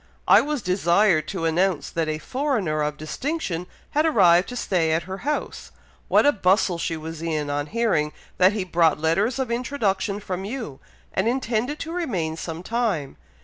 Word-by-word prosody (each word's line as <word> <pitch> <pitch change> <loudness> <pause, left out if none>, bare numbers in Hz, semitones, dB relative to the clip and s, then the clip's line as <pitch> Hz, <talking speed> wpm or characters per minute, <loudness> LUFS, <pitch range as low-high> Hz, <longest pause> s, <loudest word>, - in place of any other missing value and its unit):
I - - +7
was 295 -5 -3
desired 180 -2 +3
to 185 -4 -3
announce 175 +1 +1
that 165 -2 -1
a 155 - -1
foreigner 220 - -1
of 150 0 -2
distinction 180 - -3 0.2
had 300 - +2
arrived 185 - +4
to 250 - -6
stay 170 -8 +1
at 160 0 0
her 190 +3 -6
house. 295 +3 -3 0.4
What - - +4
a 290 - +6
bustle 185 -5 +2
she 165 -1 -2
was 160 0 -7
in 155 -3 -2
on 145 +1 -2
hearing 200 -8 +1 0.3
that 185 +2 +6
he 205 -3 -1
brought 165 -4 +2
letters 195 - +1
of 260 -3 -2
introduction 215 -5 -1
from 190 -2 -4
you, 210 - -6 0.3
and 190 +3 +1
intended 245 +2 -1
to 325 - -5
remain 190 - -2
some 165 +1 -6
time. 215 - -1
185 Hz, 175 wpm, -24 LUFS, 160-235 Hz, 0.4 s, I